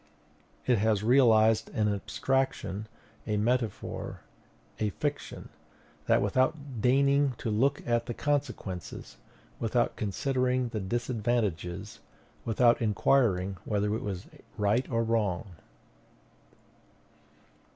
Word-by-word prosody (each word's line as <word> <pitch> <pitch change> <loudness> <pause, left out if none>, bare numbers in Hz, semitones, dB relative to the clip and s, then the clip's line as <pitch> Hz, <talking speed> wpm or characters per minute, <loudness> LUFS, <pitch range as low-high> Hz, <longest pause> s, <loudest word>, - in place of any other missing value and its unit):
It 125 -4 +3
has 105 -1 +2
realized 115 -3 +5
an 105 -1 +2
abstraction, 110 -1 -1 0.4
a 105 -1 0
metaphor, 115 0 -2 0.6
a 105 - +1
fiction; 145 +8 -4
and - - -31
that - - +4
without 130 +3 0
deigning 140 +2 +3
to 110 - -3
look 135 +7 +1
at 120 0 +1
the 120 - -4
consequences, 140 - -3 0.4
without 120 +1 +1
considering 125 +4 0
the 115 -2 -3
disadvantages, 105 -4 -2 0.5
without 120 +1 +3
inquiring 100 -4 +2
whether 105 -1 0
it 110 - -2
was 95 -3 -4 0.3
right 105 +5 +1
or 115 -1 +1
wrong. 105 -4 0
115 Hz, 100 wpm, -29 LUFS, 105-130 Hz, 0.6 s, realized